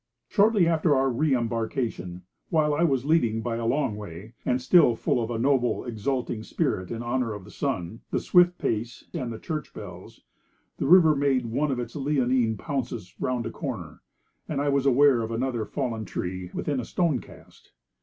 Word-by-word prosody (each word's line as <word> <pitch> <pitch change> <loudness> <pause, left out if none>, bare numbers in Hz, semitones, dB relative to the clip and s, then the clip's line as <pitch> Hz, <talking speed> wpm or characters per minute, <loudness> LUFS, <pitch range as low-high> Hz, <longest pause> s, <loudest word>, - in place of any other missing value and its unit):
Shortly 205 -4 +4
after 160 -2 +3
our 135 0 +2
re 140 +3 +2
embarkation, 115 -6 -3 0.3
while 155 -2 +2
I 150 - 0
was 135 -6 +1
leading 120 -8 +2
by 115 -2 -2
a 115 -1 -2
long 135 -4 +1
way, 105 +1 -9
and 125 0 +1
still 125 -2 +5
full 120 - 0
of 115 - -4
a 120 - -2
noble, 125 0 +1
exulting 120 0 -2
spirit 90 -4 -2
in 115 0 -4
honour 120 -2 -1
of 105 - -9
the 105 - -13
sun, 115 -6 -3
the - - 0
swift 180 0 +4
pace, 115 +1 -3
and 125 -3 -3
the 115 - -5
church 155 +2 -5
bells, - - -10 0.6
the - - -1
river 160 -2 +7
made 135 -3 +1
one 140 +6 0
of 135 - -1
its 120 -1 -5
leonine 130 -5 +1
pounces 130 - -4
round 125 -2 -1
a 115 - -4
corner, 110 - -6 0.5
and 145 - -1
I 145 0 +1
was 140 -1 +2
aware 135 -1 +5
of 110 - -3
another 115 -1 -1
fallen 120 -6 -3
tree 90 -1 -4
within 145 -3 -2
a 120 - -4
stone 165 -8 +1
cast. - - -16
125 Hz, 185 wpm, -26 LUFS, 115-145 Hz, 0.6 s, river